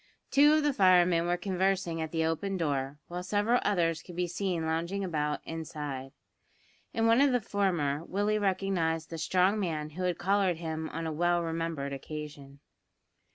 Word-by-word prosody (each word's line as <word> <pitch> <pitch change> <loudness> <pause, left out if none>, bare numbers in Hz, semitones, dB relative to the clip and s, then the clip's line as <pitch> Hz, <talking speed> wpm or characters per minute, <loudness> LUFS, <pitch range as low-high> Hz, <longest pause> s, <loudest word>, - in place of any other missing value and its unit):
Two 290 +2 +6
of 310 -1 +3
the 295 -1 +2
firemen 180 -5 +4
were 175 0 +1
conversing 185 -2 0
at 160 - -3
the 160 -1 0
open 190 +5 -1
door, 140 -4 -1
while 175 +1 -5
several 205 +6 +1
others 165 -5 +1
could 175 - -11
be 180 0 0
seen 175 -1 -2
lounging 170 +5 -1
about 150 -4 -1
inside. 150 -5 -5 0.8
In 225 -1 0
one 230 +3 +5
of 280 -1 +5
the 250 - +3
former 175 -9 0
Willie 205 +3 0
recognised 185 -5 0
the 165 - -5
strong 185 +5 +2
man 155 -5 -2
who 175 +5 -7
had 180 -2 0
collared 195 -2 +1
him 160 -1 -4
on 165 0 -4
a 160 - -2
well 175 +2 +1
remembered 165 -4 -3
occasion. 145 -1 -8
175 Hz, 170 wpm, -30 LUFS, 160-195 Hz, 0.8 s, Two